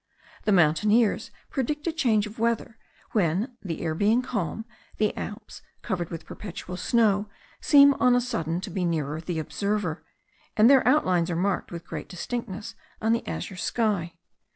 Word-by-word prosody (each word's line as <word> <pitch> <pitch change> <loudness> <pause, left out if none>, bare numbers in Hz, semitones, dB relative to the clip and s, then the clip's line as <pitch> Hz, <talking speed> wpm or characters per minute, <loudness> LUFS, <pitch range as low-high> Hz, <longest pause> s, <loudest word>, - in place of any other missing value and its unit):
The 210 - +3
mountaineers 205 +6 +3 0.2
predict 295 +2 -2
a 335 - +1
change 235 -10 +2
of 215 +2 -10
weather, 230 -1 -1 0.3
when, 205 - 0
the 170 -5 -5
air 160 -2 -1
being 215 +9 +2
calm, 220 -2 -3 0.3
the 215 -1 +1
Alps 210 +1 -7 0.2
covered 175 -3 -2
with 165 -1 -7
perpetual 180 -2 -7
snow 205 +1 +2 0.3
seem 280 -1 +7
on 250 -1 +5
a - - +4
sudden 170 -8 -2
to 195 0 -6
be 185 +1 -2
nearer 155 -3 -1
the 170 0 -4
observer, 185 +1 -2 0.5
and 215 +1 +7
their 270 -1 +6
outlines 185 - +3
are 170 - -1
marked 190 +3 -1
with 170 -1 -7
great - - -7
distinctness 210 +2 -5 0.3
on 220 +1 +1
the 230 - -2
azure 190 - -4
sky. 190 -6 -1
205 Hz, 160 wpm, -26 LUFS, 175-230 Hz, 0.5 s, seem